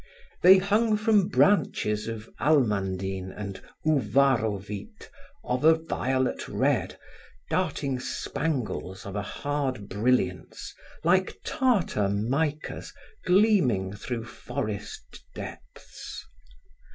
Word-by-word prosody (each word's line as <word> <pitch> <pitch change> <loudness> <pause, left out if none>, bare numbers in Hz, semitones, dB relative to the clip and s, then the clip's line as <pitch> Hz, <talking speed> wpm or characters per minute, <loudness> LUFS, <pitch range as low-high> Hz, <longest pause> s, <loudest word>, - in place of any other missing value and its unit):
They 185 +2 +9
hung 210 +3 +2
from 210 -3 +3
branches 110 - +2
of 115 -1 -5
almandine 95 -9 +1
and 100 -2 -7 0.2
ouwarovite 120 - 0 0.3
of 125 +2 -2
a 160 +1 +7
violet 130 -5 -1
red, - - 0 0.5
darting 135 -2 0
spangles 125 - -3
of 100 0 -6
a 105 - -1
hard 130 -1 -3
brilliance 120 +7 -1 0.3
like 185 +3 +2
tartar 200 - +1
micas 140 +9 -2 0.4
gleaming 180 - +3
through 115 +3 -5
forest 105 -3 -6
depths. - - -9
130 Hz, 90 wpm, -27 LUFS, 105-165 Hz, 0.5 s, They